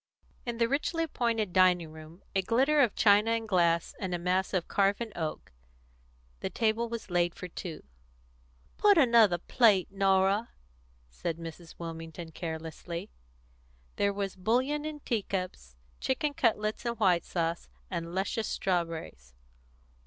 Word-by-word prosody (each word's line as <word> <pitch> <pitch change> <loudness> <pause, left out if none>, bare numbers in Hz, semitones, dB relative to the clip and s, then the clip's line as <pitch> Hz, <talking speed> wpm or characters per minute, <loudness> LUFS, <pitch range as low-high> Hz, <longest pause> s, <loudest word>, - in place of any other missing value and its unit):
In 235 -1 -2
the 230 0 +3
richly 305 +5 0
appointed 230 - -1
dining 180 -3 +4
room 160 +3 -13
a 195 - +2
glitter 265 +9 +3
of 240 -6 +2
china 210 +2 +5
and 225 -1 -2
glass 170 -4 +2
and 185 -2 -2
a - - -1
mass 180 +2 0
of 185 -3 -1
carven 200 +3 +1
oak 160 -2 -4 0.9
the - - -3
table 230 +1 0
was 230 -4 -6
laid 175 -1 +1
for 180 - -7
two. 175 -1 -7 1.0
"Put 410 -2 +6
another 230 - +6
plate, 200 0 +3
Norah," 195 +2 +2 0.6
said 160 - -4
Mrs. 165 0 -9
Wilmington 165 0 -7
carelessly. 165 - -6 0.9
There 200 0 +2
was 200 -1 -3
bouillon 255 +10 0
in 305 -1 -5
teacups, 185 - -3 0.2
chicken 290 +2 -1
cutlets 220 -8 0
in 235 -1 -1
white 185 -7 +2
sauce, 170 -1 -2 0.2
and 170 -1 -4
luscious 205 +3 -1
strawberries. 165 - -3
195 Hz, 135 wpm, -30 LUFS, 170-230 Hz, 1.0 s, Put